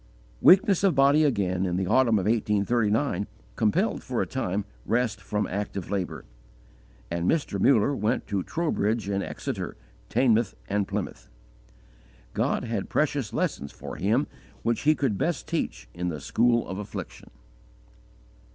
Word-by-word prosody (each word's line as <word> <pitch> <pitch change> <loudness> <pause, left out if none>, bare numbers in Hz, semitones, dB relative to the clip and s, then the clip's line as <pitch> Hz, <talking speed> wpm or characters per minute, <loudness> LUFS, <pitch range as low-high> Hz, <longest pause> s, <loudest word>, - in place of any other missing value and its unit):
Weakness 195 +1 +6
of 190 -6 +4
body 140 +3 +5
again, 95 -10 +1
in 90 -2 0
the 95 - 0
autumn 115 +2 +4
of 95 - -1
1839, 105 +2 +1 0.3
compelled, 110 -3 +1
for - - -3
a - - +1
time, 95 +2 -2 0.2
rest 120 -1 0
from 105 0 -1
active 100 -1 -4
labour, 95 -3 -3 0.9
and 85 +1 0
Mr. 140 -11 0
Muller 135 +3 +4
went 115 +1 0
to 100 -3 -1
Trowbridge 115 - -1
and 100 0 0
Exeter, - - -5 0.3
Teignmouth 115 -5 +2
and 100 -1 0
Plymouth. - - -5 1.0
God - - 0
had 115 -5 -3
precious 145 -6 0
lessons 70 +1 -2
for - - -8
him 110 +10 +2 0.4
which 115 -1 0
He 155 - +6
could 125 -10 0
best 170 -3 -1
teach 155 - -3
in 90 0 -2
the 75 -3 -4
school 120 - +2
of 95 - -5
affliction. 105 0 -7
110 Hz, 140 wpm, -26 LUFS, 100-130 Hz, 1.0 s, Weakness